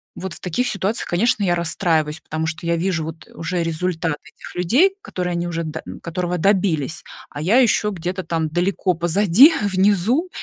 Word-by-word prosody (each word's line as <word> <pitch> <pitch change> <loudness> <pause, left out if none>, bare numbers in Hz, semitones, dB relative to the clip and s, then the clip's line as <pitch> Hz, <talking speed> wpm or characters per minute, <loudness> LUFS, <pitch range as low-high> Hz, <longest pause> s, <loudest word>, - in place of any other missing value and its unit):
вот 190 0 -6
в - - -10
таких 185 +8 -1
ситуациях, 200 +3 -2
конечно, 205 +4 +1
я 175 -2 +2
расстраиваюсь, 160 -2 0
потому 160 +1 -4
что 165 +1 -5
я 170 0 +1
вижу 170 -2 -1
вот 160 +1 -9
уже 170 +1 -2
результаты 165 -1 -1 0.2
этих - - -12
людей, 260 - +3
которые 180 - -4
они 170 0 -2
уже 165 -1 -3
д 160 0 -5 0.2
которого 175 +1 -2
добились, 175 -5 +1 0.3
а 145 - -7
я 200 +10 +3
ещё 210 -3 +3
где-то 180 +1 -4
там 160 -2 -1
далеко 180 +2 0
позади, 200 - +5
внизу, 205 - +2
175 Hz, 175 wpm, -21 LUFS, 165-200 Hz, 0.3 s, позади